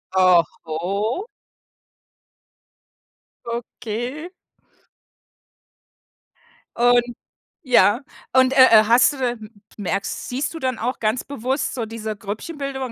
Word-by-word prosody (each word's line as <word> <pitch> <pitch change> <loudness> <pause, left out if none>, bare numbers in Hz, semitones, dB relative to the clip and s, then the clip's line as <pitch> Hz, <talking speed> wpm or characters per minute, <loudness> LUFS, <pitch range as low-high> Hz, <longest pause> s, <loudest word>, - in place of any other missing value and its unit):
Oho. 185 - +1 2.2
Okay. 240 +5 -5 2.5
Und 245 0 +5 0.6
ja, 240 -2 +4 0.3
und, 260 0 +4
äh, 260 -5 +8
äh, 215 - -2
hast 240 +6 +5
du - - -9
da 255 -2 0
m 220 -2 -10 0.3
merkst 195 -1 -3
siehst 270 +5 -2
du 325 - -7
dann 255 -5 -2
auch 245 +3 -2
ganz 220 +3 0
bewusst 265 0 -3
so 235 -3 -3
diese 220 -1 -5
Grüppchenbildung, 265 +7 -5
240 Hz, 100 wpm, -21 LUFS, 215-260 Hz, 2.5 s, äh